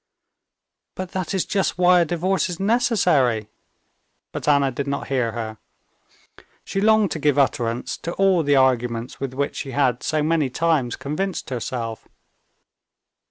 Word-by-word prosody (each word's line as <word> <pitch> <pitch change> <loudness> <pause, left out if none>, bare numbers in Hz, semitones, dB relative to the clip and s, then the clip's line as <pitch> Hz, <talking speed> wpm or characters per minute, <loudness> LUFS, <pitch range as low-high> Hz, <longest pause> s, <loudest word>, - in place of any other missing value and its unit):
"But 185 -1 -6
that 185 -2 -3
is 190 - 0
just 195 -2 -1
why 180 0 +5
a 170 - +3
divorce 180 +4 0
is 175 - -5
necessary." 175 - +2 0.8
But - - -6
Anna 140 -2 +3
did 140 +3 -4
not 140 0 -3
hear 125 -4 0
her. 110 -2 -5 1.0
She 195 - -3
longed 215 -2 +4
to 160 - -3
give 145 -1 +2
utterance 120 -3 0
to 170 - -5
all 195 -3 +3
the 145 -2 +2
arguments 125 -3 +1
with 135 -2 -4
which 140 +1 -2
she 135 - -5
had 130 -3 +1
so 155 -1 0
many 155 -3 +1
times 150 -4 0
convinced 155 +4 -4
herself. 115 -2 -4
145 Hz, 150 wpm, -22 LUFS, 125-180 Hz, 1.0 s, why